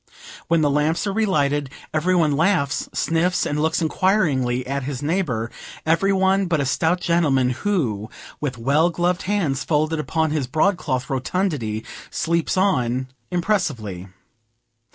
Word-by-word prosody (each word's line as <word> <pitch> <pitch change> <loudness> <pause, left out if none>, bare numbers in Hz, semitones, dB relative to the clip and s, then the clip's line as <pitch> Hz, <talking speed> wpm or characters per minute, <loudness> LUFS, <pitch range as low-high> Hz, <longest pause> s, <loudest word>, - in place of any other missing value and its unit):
When 165 0 +3
the 150 - +3
lamps 150 +5 +1
are 200 - -1
relighted, 145 -10 +1 0.2
every 170 +4 +2
one 160 -4 +3
laughs, 160 -3 +1
sniffs, 165 +4 +1
and 150 +1 -1
looks 160 +2 +1
inquiringly 150 -9 +1
at 140 +1 -2
his 135 0 -5
neighbor 145 -9 -1 0.3
every 165 +5 +3
one 190 0 +2
but 165 -3 +1
a 140 - 0
stout 160 +7 +1
gentleman, 145 -8 +2
who, 125 - -1 0.3
with 135 -4 -3
well 145 +8 +2
gloved 175 +1 0
hands 165 -10 0
folded 155 0 0
upon 160 0 0
his 150 -4 -1
broad 170 +9 +2
cloth 130 -6 -2
rotundity, 135 - -2 0.2
sleeps 170 +2 0
on 130 -9 +1 0.2
impressively. 140 - -1
155 Hz, 140 wpm, -22 LUFS, 135-180 Hz, 0.3 s, When